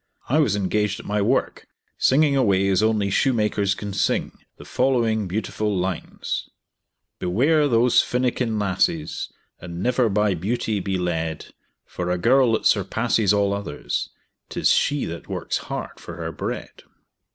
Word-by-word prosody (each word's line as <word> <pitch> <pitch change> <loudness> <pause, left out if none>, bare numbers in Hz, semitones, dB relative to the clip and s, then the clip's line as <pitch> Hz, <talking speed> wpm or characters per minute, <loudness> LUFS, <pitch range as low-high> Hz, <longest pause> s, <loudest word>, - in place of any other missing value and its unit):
I 145 +5 +3
was 115 -10 +2
engaged 105 +1 0
at - - -11
my 105 0 0
work, 120 +7 0 0.3
singing 145 +1 +4
away 100 -7 +3
as 95 0 +3
only 110 -2 +1
shoemakers 105 -4 +1
can 100 -1 -6
sing, - - 0 0.3
the - - -12
following 115 -5 +1
beautiful 105 +1 -2
lines: 90 -1 -3 0.7
"Beware 145 - +2
those 120 -1 +4
finikin 125 -2 -1
lasses, 90 -6 -1 0.3
And 85 +1 -6
never 125 -1 +2
by 105 0 +2
beauty 105 +4 -1
be 95 0 -2
led; 80 -3 -3 0.3
For 90 0 -4
a 90 - +1
girl 120 +4 +4
that 110 - -1
surpasses 110 +1 +2
all 100 -1 +2
others 100 -8 -3 0.4
'Tis - - +1
she 145 -1 +2
that 85 0 -7
works - - -2
hard - - -5
for - - -9
her - - -5
bread." - - -6
105 Hz, 145 wpm, -23 LUFS, 95-120 Hz, 0.7 s, singing